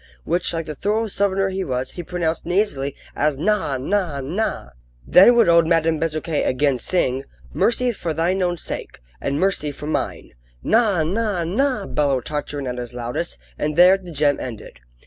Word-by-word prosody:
which, 175 Hz, +2 st, 0 dB
like 165 Hz, -1 st, -3 dB
the 155 Hz, -, -5 dB
thorough 210 Hz, +9 st, 0 dB
southerner 195 Hz, -1 st, +1 dB
he 190 Hz, 0 st, -2 dB
was, 130 Hz, -2 st, -3 dB
he 175 Hz, -, -6 dB
pronounced 170 Hz, -1 st, -2 dB
nasally 170 Hz, -7 st, 0 dB, 0.2 s
as 150 Hz, -2 st, +1 dB
"Naw! 185 Hz, -4 st, 0 dB
naw! 165 Hz, +1 st, -1 dB
naw!" 145 Hz, -, -3 dB, 0.3 s
Then 215 Hz, +7 st, +7 dB
would 235 Hz, -, +5 dB
old 170 Hz, -1 st, +5 dB
Madame 165 Hz, -1 st, +2 dB
Bezuquet 155 Hz, -1 st, -1 dB
again 135 Hz, 0 st, +1 dB
sing: 135 Hz, -4 st, 0 dB, 0.3 s
"Mercy 245 Hz, +1 st, +2 dB
for 175 Hz, -7 st, -4 dB
thine 170 Hz, +5 st, 0 dB
own 175 Hz, -1 st, 0 dB
sake, -, -, -6 dB, 0.2 s
And 140 Hz, +1 st, -1 dB
mercy 185 Hz, -6 st, 0 dB
for 145 Hz, -, -9 dB
mine!" 155 Hz, -, -3 dB, 0.3 s
"Naw! 210 Hz, -8 st, +3 dB
naw! 200 Hz, +1 st, -1 dB
naw!" 215 Hz, +5 st, 0 dB
bellowed 140 Hz, -4 st, 0 dB
Tartarin 145 Hz, -1 st, -4 dB
at 125 Hz, -1 st, -4 dB
his 120 Hz, 0 st, -6 dB
loudest, 120 Hz, +8 st, -4 dB, 0.2 s
and 150 Hz, 0 st, -1 dB
there 180 Hz, +3 st, +7 dB
the 190 Hz, -2 st, -9 dB
gem 145 Hz, -2 st, +1 dB
ended. 110 Hz, -, -8 dB
165 Hz, 170 wpm, -21 LUFS, 145-195 Hz, 0.3 s, Then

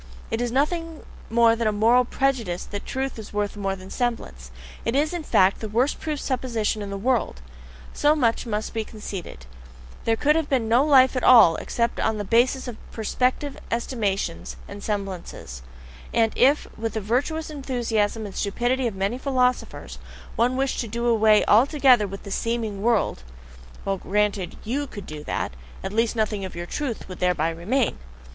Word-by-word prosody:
It 225 Hz, -, -1 dB
is 240 Hz, -1 st, -1 dB
nothing 325 Hz, +4 st, -1 dB, 0.3 s
more 230 Hz, 0 st, +5 dB
than 230 Hz, -1 st, -1 dB
a -, -, +3 dB
moral 230 Hz, +4 st, +4 dB
prejudice 235 Hz, -10 st, -1 dB
that 205 Hz, -1 st, -7 dB
truth 265 Hz, -2 st, -3 dB
is 215 Hz, -, -9 dB
worth 205 Hz, 0 st, -1 dB
more 195 Hz, -2 st, -2 dB
than 190 Hz, 0 st, -12 dB
semblance; 225 Hz, -, -3 dB, 0.3 s
it 230 Hz, -, -1 dB
is, 300 Hz, +4 st, +1 dB
in 350 Hz, -, -2 dB
fact, 195 Hz, -10 st, +3 dB
the 220 Hz, -, -5 dB
worst 245 Hz, +7 st, +1 dB
proved 305 Hz, -3 st, -3 dB
supposition 235 Hz, -5 st, -1 dB
in 200 Hz, -, -5 dB
the 200 Hz, -, -4 dB
world. 235 Hz, -, 0 dB, 0.5 s
So 295 Hz, +1 st, +3 dB
much 240 Hz, -4 st, +1 dB
must 215 Hz, -1 st, -3 dB
be 225 Hz, -1 st, -1 dB
conceded: 195 Hz, -, -8 dB, 0.6 s
there 225 Hz, -, +3 dB
could 295 Hz, +6 st, +2 dB
have 320 Hz, -2 st, 0 dB
been 250 Hz, -5 st, +1 dB
no 235 Hz, +4 st, +4 dB
life 265 Hz, -3 st, +5 dB
at 255 Hz, -, -1 dB
all 225 Hz, -10 st, +8 dB
except 235 Hz, 0 st, -1 dB
upon 220 Hz, -1 st, +1 dB
the 205 Hz, -, -2 dB
basis 245 Hz, +6 st, +2 dB
of 240 Hz, -3 st, -6 dB
perspective 255 Hz, +5 st, -1 dB
estimates 210 Hz, -7 st, -2 dB
and 200 Hz, 0 st, -9 dB
semblances; 190 Hz, -, -5 dB, 0.5 s
and 225 Hz, -1 st, +2 dB
if, 275 Hz, +4 st, +4 dB
with 225 Hz, 0 st, -3 dB
the 220 Hz, -, -1 dB
virtuous 285 Hz, +10 st, -1 dB
enthusiasm 230 Hz, -6 st, -1 dB
and 200 Hz, -, -7 dB
stupidity 245 Hz, +5 st, 0 dB
of 220 Hz, -, -4 dB
many 200 Hz, +6 st, -1 dB
philosophers, 255 Hz, -2 st, -1 dB, 0.4 s
one 250 Hz, +2 st, +2 dB
wished 270 Hz, 0 st, 0 dB
to 235 Hz, -, -2 dB
do 235 Hz, +2 st, -3 dB
away 220 Hz, -2 st, +4 dB
altogether 250 Hz, -1 st, +5 dB
with 195 Hz, +1 st, -8 dB
the 200 Hz, -, -8 dB
"seeming 225 Hz, -2 st, -2 dB
world" 225 Hz, -, +1 dB, 0.6 s
well, 195 Hz, 0 st, 0 dB
granted 200 Hz, -1 st, 0 dB
that -, -, -15 dB
YOU 280 Hz, +5 st, -1 dB
could 205 Hz, -6 st, -9 dB
do 150 Hz, -1 st, -8 dB
that, -, -, -2 dB, 0.3 s
at 190 Hz, -, -4 dB
least 230 Hz, +1 st, +1 dB
nothing 215 Hz, -2 st, -1 dB
of 185 Hz, -, -6 dB
your 175 Hz, 0 st, -4 dB
"truth" 255 Hz, +4 st, -4 dB
would 185 Hz, -1 st, -9 dB
thereby 175 Hz, -3 st, +1 dB
remain! 215 Hz, -, -1 dB
230 Hz, 180 wpm, -24 LUFS, 205-255 Hz, 0.6 s, all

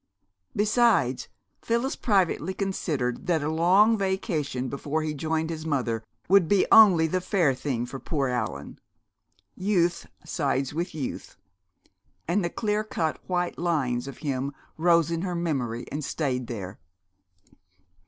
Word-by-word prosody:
Besides, 210 Hz, -, +2 dB, 0.3 s
Phyllis 235 Hz, +4 st, 0 dB
privately 190 Hz, -, +1 dB
considered 150 Hz, -11 st, -2 dB
that 165 Hz, -4 st, +1 dB
a 150 Hz, -, -1 dB
long 190 Hz, +8 st, +4 dB
vacation 160 Hz, -, -1 dB
before 145 Hz, +4 st, -2 dB
he 155 Hz, -1 st, -2 dB
joined 160 Hz, +2 st, -1 dB
his 160 Hz, -1 st, -5 dB
mother 125 Hz, -8 st, -1 dB, 0.2 s
would 195 Hz, -2 st, +5 dB
be 200 Hz, +1 st, +3 dB
only 190 Hz, -7 st, +8 dB
the 185 Hz, +3 st, 0 dB
fair 180 Hz, -7 st, +2 dB
thing 125 Hz, -2 st, -2 dB
for 130 Hz, +2 st, -7 dB
"poor 140 Hz, -2 st, -1 dB
Allan." 110 Hz, -, -4 dB, 0.8 s
Youth 180 Hz, -3 st, 0 dB, 0.2 s
sides 135 Hz, -2 st, -1 dB
with 170 Hz, +1 st, -3 dB
youth. 140 Hz, -5 st, -5 dB, 0.9 s
And 180 Hz, +4 st, +1 dB
the 170 Hz, -, 0 dB
clear 210 Hz, +2 st, -1 dB
cut 160 Hz, -7 st, -2 dB
white 180 Hz, -1 st, -1 dB
lines 135 Hz, -8 st, 0 dB
of 140 Hz, -, -8 dB
him 140 Hz, 0 st, -2 dB, 0.2 s
rose 170 Hz, -1 st, +3 dB
in 165 Hz, 0 st, -1 dB
her 180 Hz, -1 st, -2 dB
memory 130 Hz, -9 st, -2 dB
and 150 Hz, +1 st, -3 dB
stayed 130 Hz, -5 st, -2 dB
there. 100 Hz, -6 st, -6 dB
160 Hz, 135 wpm, -26 LUFS, 135-185 Hz, 0.9 s, only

